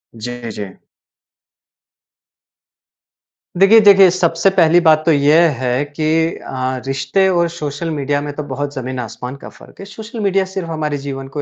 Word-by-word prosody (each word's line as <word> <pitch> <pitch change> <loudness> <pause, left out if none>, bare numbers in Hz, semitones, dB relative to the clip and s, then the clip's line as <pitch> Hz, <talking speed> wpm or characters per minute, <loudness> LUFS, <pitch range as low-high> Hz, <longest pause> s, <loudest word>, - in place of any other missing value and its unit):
जी, 120 +1 -7
जी। 105 -2 -6 2.9
देखिए, 200 +4 +6
देखिए 195 -2 +7
सबसे 170 +1 +1
पहली 170 0 +5
बात 155 -2 +4
तो 165 - +3
यह 155 +3 +4
है 125 +2 -1
कि 150 +2 -5 0.3
अ, 130 -1 -4
रिश्ते 135 +8 0
और 170 -2 +1
सोशल 155 -1 -5
मीडिया 145 -1 -1
में 145 0 -5
तो 150 - -5
बहुत 145 +1 -4
ज़मीन-आसमान 125 -1 -6
का - - -9
फ़र्क़ - - -18
है। 195 - -8
सोशल 220 +3 -10
मीडिया 195 -2 +1
सिर्फ़ 185 -3 -5
हमारे 150 -2 -3
जीवन 135 -1 -7
को 145 - -3
150 Hz, 150 wpm, -17 LUFS, 135-175 Hz, 2.9 s, देखिए